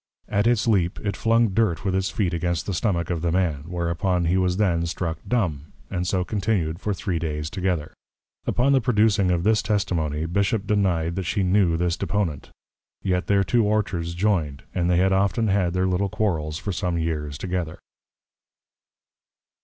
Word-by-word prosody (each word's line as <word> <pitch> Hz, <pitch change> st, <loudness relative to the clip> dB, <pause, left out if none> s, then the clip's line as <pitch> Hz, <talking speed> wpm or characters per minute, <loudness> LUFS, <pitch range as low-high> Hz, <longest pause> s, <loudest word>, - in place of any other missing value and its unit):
At 105 Hz, +2 st, +1 dB
its 120 Hz, -1 st, +2 dB
leap, 95 Hz, -5 st, +2 dB
it 100 Hz, -1 st, -2 dB
flung 115 Hz, 0 st, +3 dB
Dirt 100 Hz, -4 st, 0 dB
with 95 Hz, -, +1 dB
its 95 Hz, +1 st, 0 dB
Feet 95 Hz, -5 st, -1 dB
against 85 Hz, 0 st, -1 dB
the 100 Hz, -, -2 dB
Stomack 85 Hz, -3 st, 0 dB
of 85 Hz, -2 st, -2 dB
the 85 Hz, 0 st, 0 dB
Man; 80 Hz, -6 st, 0 dB
whereon 90 Hz, +1 st, -1 dB
he 85 Hz, +2 st, +2 dB
was 90 Hz, -1 st, +1 dB
then 85 Hz, -5 st, +1 dB
struck 85 Hz, -1 st, -3 dB
Dumb, 85 Hz, -, -1 dB, 0.2 s
and 90 Hz, 0 st, -2 dB
so 90 Hz, -1 st, +1 dB
continued 95 Hz, -5 st, -1 dB
for 105 Hz, -, -1 dB
three 95 Hz, -3 st, -2 dB
Days 75 Hz, -1 st, -3 dB
together. 90 Hz, -5 st, -2 dB, 0.5 s
Upon 130 Hz, +3 st, +2 dB
the 135 Hz, -, +4 dB
producing 105 Hz, -5 st, +3 dB
of 85 Hz, -1 st, +1 dB
this 110 Hz, +1 st, +3 dB
Testimony, 85 Hz, -7 st, -1 dB
Bishop 100 Hz, +4 st, 0 dB
deny'd 90 Hz, -5 st, +1 dB
that 95 Hz, -, -2 dB
she 95 Hz, +3 st, 0 dB
knew 90 Hz, -3 st, +3 dB
this 85 Hz, 0 st, 0 dB
Deponent: 90 Hz, -9 st, -2 dB, 0.5 s
Yet 90 Hz, -1 st, 0 dB
their 100 Hz, -1 st, +3 dB
two 120 Hz, +3 st, +2 dB
Orchards 95 Hz, -5 st, -1 dB
joined; 85 Hz, -8 st, 0 dB
and 90 Hz, -1 st, 0 dB
they 90 Hz, -, +3 dB
had 95 Hz, +1 st, +3 dB
often 100 Hz, +3 st, +1 dB
had 95 Hz, -3 st, +1 dB
their 90 Hz, 0 st, +1 dB
little 95 Hz, +2 st, 0 dB
Quarrels 80 Hz, -8 st, -1 dB
for 100 Hz, +4 st, -4 dB
some 90 Hz, -2 st, -1 dB
years 75 Hz, -3 st, -2 dB
together. 90 Hz, -1 st, -3 dB
90 Hz, 175 wpm, -24 LUFS, 85-100 Hz, 0.5 s, the